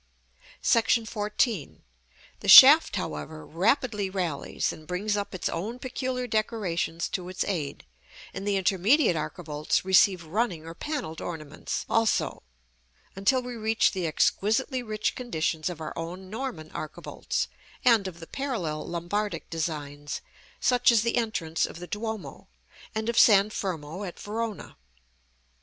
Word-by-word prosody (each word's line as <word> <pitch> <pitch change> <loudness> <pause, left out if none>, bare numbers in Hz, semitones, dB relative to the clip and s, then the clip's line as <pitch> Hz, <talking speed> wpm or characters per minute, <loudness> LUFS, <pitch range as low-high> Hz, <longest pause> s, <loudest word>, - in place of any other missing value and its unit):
§ 230 0 +3
XIV. 210 - -1 0.6
The - - -7
shaft, - - +10
however, 75 +1 -5
rapidly 210 - +1
rallies, 175 -7 -2
and 155 - -13
brings 205 +5 -1
up 205 -1 -3
its 180 - -2
own 210 +9 -3
peculiar 255 0 -3
decorations 200 -7 -1
to 180 -1 -4
its 185 - -2
aid; 160 -8 -4 0.5
and 195 - -5
the 205 - +2
intermediate 195 - +3
archivolts 155 0 -2
receive 190 -1 +4
running 175 -1 -2
or 165 - -7
panelled 250 - -5
ornaments, 155 -4 -5
also, 225 -1 +1 0.7
until 250 +7 +2
we 250 0 -6
reach 220 0 +2
the 185 -4 -2
exquisitely 225 - +1
rich 215 -3 -2
conditions 165 -8 -2
of 175 -3 -7
our 155 - -5
own 180 +3 -6
Norman 220 -10 -5
archivolts, 155 - -4 0.4
and 225 -6 +5
of 170 -2 -8
the 165 - -9
parallel 190 - -3
Lombardic 175 +2 -3
designs, 145 -3 -4 0.4
such 245 -1 +4
as 225 -2 +3
the 235 - 0
entrance 185 -9 0
of - - -10
the 175 - -7
Duomo, 220 +1 -6 0.5
and 220 0 -2
of 235 - +2
San 205 -1 +6
Fermo, 175 -2 -4
at 180 -3 -7
Verona. 220 0 -5
195 Hz, 135 wpm, -27 LUFS, 165-225 Hz, 0.7 s, shaft